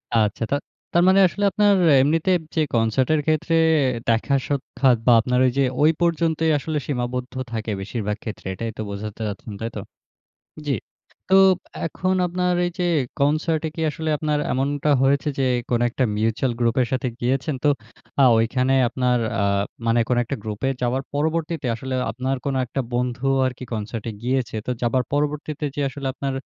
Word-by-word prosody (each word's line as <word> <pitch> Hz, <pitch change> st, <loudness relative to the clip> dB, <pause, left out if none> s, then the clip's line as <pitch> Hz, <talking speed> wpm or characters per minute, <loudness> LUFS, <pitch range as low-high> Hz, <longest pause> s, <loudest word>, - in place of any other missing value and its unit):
আচ্ছা 110 Hz, 0 st, +1 dB
তা -, -, +3 dB, 0.4 s
তার 175 Hz, -, +4 dB
মানে 190 Hz, +1 st, +6 dB
আসলে 205 Hz, +3 st, -4 dB
আপনার 205 Hz, 0 st, +4 dB, 0.3 s
এমনিতে 160 Hz, +6 st, +2 dB, 0.2 s
যে, 160 Hz, -, +3 dB
কনসার্টের 125 Hz, +7 st, +2 dB
ক্ষেত্রে, 155 Hz, +1 st, +1 dB, 0.5 s
দেখা 115 Hz, +4 st, +2 dB
সাক্ষাৎ, 135 Hz, -2 st, +1 dB
বা 125 Hz, -, +6 dB
আপনার 125 Hz, +2 st, 0 dB
ওই 130 Hz, -, +3 dB
যে, 140 Hz, -, +4 dB, 0.2 s
ওই 155 Hz, +2 st, +6 dB
পর্যন্তই 165 Hz, -1 st, +1 dB
আসলে 155 Hz, +2 st, -3 dB
সীমাবদ্ধ 125 Hz, -2 st, -3 dB, 0.2 s
থাকে, 110 Hz, -1 st, -3 dB
বেশিরভাগ 105 Hz, +1 st, -3 dB
ক্ষেত্রে। 110 Hz, -2 st, -7 dB
এটাই 115 Hz, +4 st, -4 dB
তো -, -, -3 dB
বোঝাতে 105 Hz, +2 st, -6 dB
চাচ্ছেন, 105 Hz, +1 st, -6 dB
তাই 115 Hz, -, -2 dB
তো? 105 Hz, -, -4 dB, 0.9 s
জ্বি। 140 Hz, -, +1 dB, 0.5 s
তো 190 Hz, -, +3 dB, 0.5 s
এখন 185 Hz, +3 st, -1 dB
আপনার 180 Hz, +1 st, 0 dB
এই -, -, -2 dB
যে, 180 Hz, -, 0 dB, 0.4 s
কনসার্টে 155 Hz, +2 st, +1 dB
কি -, -, -5 dB
আসলে 160 Hz, +2 st, -5 dB
আপনার 150 Hz, -1 st, 0 dB
এমনটা 140 Hz, +3 st, 0 dB
হয়েছে, 140 Hz, +2 st, +2 dB
যে, 135 Hz, -, +2 dB, 0.3 s
কোন 120 Hz, -1 st, +2 dB
একটা 130 Hz, +2 st, 0 dB
মিউচ্যুয়াল 115 Hz, +4 st, 0 dB
গ্রুপের 120 Hz, +1 st, +2 dB
সাথে 130 Hz, 0 st, 0 dB
গিয়েছেন। 135 Hz, +4 st, 0 dB
তো -, -, +5 dB, 0.5 s
আ -, -, +7 dB
ঐখানে 125 Hz, +3 st, +1 dB, 0.2 s
আপনার 125 Hz, 0 st, +1 dB, 0.2 s
আ -, -, +2 dB, 0.4 s
মানে 115 Hz, +1 st, +3 dB
কোন 125 Hz, -, +2 dB
একটা 140 Hz, +4 st, -4 dB
গ্রুপে 110 Hz, +4 st, -3 dB
যাওয়ার 125 Hz, +2 st, 0 dB
পরবর্তীতে 160 Hz, 0 st, -1 dB
আসলে 130 Hz, +3 st, -5 dB, 0.2 s
আপনার 130 Hz, +2 st, -2 dB
কোন 140 Hz, -, -1 dB
একটা 135 Hz, -, -3 dB
বন্ধু 125 Hz, +1 st, -1 dB, 0.2 s
আরকি 130 Hz, 0 st, -5 dB
কনসার্টে 110 Hz, +1 st, -4 dB
গিয়েছে। 130 Hz, 0 st, -1 dB
তো -, -, -2 dB
যাবার 125 Hz, +2 st, +2 dB
পরবর্তীতে 150 Hz, +1 st, -2 dB
যে, -, -, -1 dB
আসলে 135 Hz, 0 st, -5 dB
আপনার 135 Hz, 0 st, -3 dB
130 Hz, 165 wpm, -22 LUFS, 120-150 Hz, 0.9 s, আ